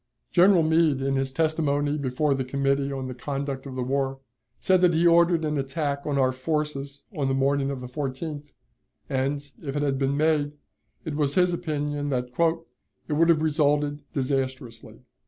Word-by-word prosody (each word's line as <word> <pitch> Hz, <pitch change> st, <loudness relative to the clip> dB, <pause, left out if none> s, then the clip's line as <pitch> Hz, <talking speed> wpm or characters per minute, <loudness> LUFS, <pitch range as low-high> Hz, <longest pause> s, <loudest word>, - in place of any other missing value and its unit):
General 180 Hz, -1 st, +5 dB
Meade, 160 Hz, -3 st, +3 dB
in 135 Hz, 0 st, 0 dB
his 135 Hz, 0 st, -1 dB
testimony 145 Hz, -1 st, 0 dB
before 140 Hz, +1 st, 0 dB
the 135 Hz, -1 st, -1 dB
Committee 140 Hz, +1 st, 0 dB
on 135 Hz, -1 st, -4 dB
the 130 Hz, -, -5 dB
Conduct 135 Hz, +2 st, -4 dB
of 130 Hz, -, -7 dB
the 130 Hz, -, -2 dB
War, 135 Hz, +1 st, -1 dB, 0.4 s
said 185 Hz, -1 st, +3 dB
that 175 Hz, -2 st, +4 dB
he 165 Hz, +2 st, +3 dB
ordered 170 Hz, -1 st, +4 dB
an 150 Hz, -1 st, -1 dB
attack 140 Hz, +1 st, -2 dB
on 145 Hz, -2 st, 0 dB
our 130 Hz, -1 st, +3 dB
forces 140 Hz, 0 st, -3 dB
on 140 Hz, -4 st, 0 dB
the 135 Hz, -, +1 dB
morning 140 Hz, +1 st, +1 dB
of 135 Hz, -2 st, -4 dB
the 125 Hz, -, -6 dB
14th, 145 Hz, +2 st, -5 dB, 0.6 s
and, 140 Hz, +2 st, -2 dB
if 140 Hz, -3 st, -5 dB
it 145 Hz, -, 0 dB
had 135 Hz, -2 st, 0 dB
been 140 Hz, +1 st, 0 dB
made, 150 Hz, -1 st, +1 dB, 0.5 s
it 160 Hz, -, -3 dB
was 145 Hz, -1 st, 0 dB
his 180 Hz, -1 st, +3 dB
opinion 145 Hz, -4 st, -2 dB
that 125 Hz, -2 st, -1 dB, 0.8 s
"it 155 Hz, -, -2 dB
would 165 Hz, +3 st, +3 dB
have 155 Hz, -2 st, +4 dB
resulted 145 Hz, -1 st, +1 dB
disastrously." 130 Hz, -4 st, -3 dB
145 Hz, 175 wpm, -25 LUFS, 135-155 Hz, 0.8 s, General